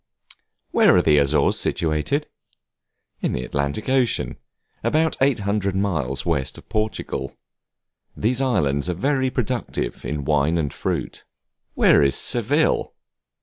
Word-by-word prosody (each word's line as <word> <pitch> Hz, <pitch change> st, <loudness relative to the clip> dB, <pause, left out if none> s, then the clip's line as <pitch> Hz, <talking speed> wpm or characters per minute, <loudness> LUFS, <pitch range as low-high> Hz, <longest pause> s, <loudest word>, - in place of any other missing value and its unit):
Where -, -, +5 dB
are -, -, +5 dB
the 75 Hz, -1 st, +4 dB
Azores 70 Hz, +2 st, +2 dB
situated? 80 Hz, -, 0 dB, 1.0 s
In -, -, -1 dB
the 60 Hz, -, -2 dB
Atlantic 70 Hz, +9 st, -3 dB
Ocean, 130 Hz, -3 st, +1 dB, 0.5 s
about 155 Hz, +7 st, +1 dB
800 100 Hz, -7 st, +1 dB
miles 80 Hz, -10 st, -1 dB
west 70 Hz, -6 st, -1 dB
of -, -, -14 dB
Portugal. 105 Hz, -, -3 dB, 0.8 s
These 125 Hz, +4 st, +1 dB
islands 75 Hz, -, +1 dB
are 90 Hz, -, -1 dB
very 130 Hz, -, 0 dB
productive 125 Hz, -1 st, -3 dB
in 75 Hz, -2 st, -4 dB
wine 75 Hz, +3 st, +2 dB
and 75 Hz, -4 st, -2 dB
fruits. -, -, -4 dB, 0.5 s
Where -, -, +5 dB
is 70 Hz, -2 st, +4 dB
Seville? 135 Hz, +7 st, +1 dB
95 Hz, 120 wpm, -22 LUFS, -, 1.0 s, Where